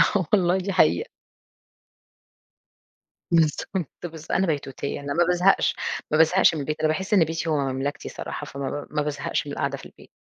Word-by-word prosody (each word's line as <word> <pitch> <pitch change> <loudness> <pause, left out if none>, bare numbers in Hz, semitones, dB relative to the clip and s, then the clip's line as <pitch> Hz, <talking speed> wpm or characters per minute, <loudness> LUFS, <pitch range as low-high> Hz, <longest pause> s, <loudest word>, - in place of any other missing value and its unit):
آه 190 -3 +2
والله 180 -2 +4
دي 190 +1 -2
حقيقة. - - +3 2.2
بالضبط 165 +1 +1
بالض 165 -2 -7
أنا 190 0 +2
بيتوتية، 140 -2 -3
أنا 140 0 -4
ما 175 +3 +3
بازهقش، 180 +2 +3 0.4
ما 155 - +3
بازهقش 160 +4 +5
من 155 - -3
البيت، 150 +2 -3
أنا 155 - +2
باحس 190 +6 -1
إن 190 -5 +6
بيتي 160 +1 -3
هو 155 - +2
مملكتي 135 +1 -2
صراحة، - - -6
فما 140 -1 -5
ب 145 - -5
ما 150 - +1
بازهقش 145 -1 -2
من - - -5
القعدة - - -2
في - - -12
البيت. - - -16
160 Hz, 175 wpm, -24 LUFS, 145-180 Hz, 2.2 s, إن